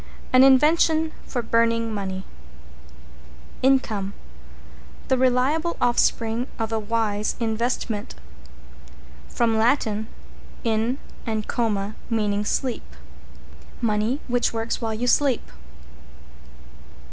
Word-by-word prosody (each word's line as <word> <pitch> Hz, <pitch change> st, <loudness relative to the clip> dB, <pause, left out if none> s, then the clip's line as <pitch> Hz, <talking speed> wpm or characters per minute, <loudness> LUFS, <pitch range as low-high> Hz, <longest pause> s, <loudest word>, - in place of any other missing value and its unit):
An 255 Hz, -, +7 dB
invention 315 Hz, +4 st, +4 dB, 0.2 s
for 245 Hz, -3 st, -2 dB
burning 230 Hz, 0 st, +1 dB
money. 190 Hz, -2 st, -4 dB, 1.4 s
=INCOME= 225 Hz, -7 st, +1 dB, 1.0 s
The 260 Hz, -, +3 dB
reliable 265 Hz, +7 st, +2 dB
offspring 235 Hz, 0 st, +1 dB
of 225 Hz, -1 st, -2 dB
a 225 Hz, -, 0 dB
wise 215 Hz, -1 st, -1 dB
investment. 225 Hz, -1 st, -2 dB, 1.1 s
From 225 Hz, -2 st, +1 dB
Lat. 245 Hz, +6 st, +3 dB
in 220 Hz, +2 st, -4 dB, 0.3 s
and 220 Hz, -2 st, -2 dB
coma, 210 Hz, -4 st, -1 dB, 0.2 s
meaning 210 Hz, -2 st, 0 dB
sleep. 230 Hz, -, -2 dB, 0.8 s
Money 225 Hz, +3 st, 0 dB
which 245 Hz, -1 st, +1 dB
works 225 Hz, +1 st, -3 dB
while 225 Hz, -1 st, -2 dB
you 235 Hz, +3 st, -2 dB
sleep. 260 Hz, 0 st, +2 dB
230 Hz, 90 wpm, -24 LUFS, 215-255 Hz, 1.4 s, An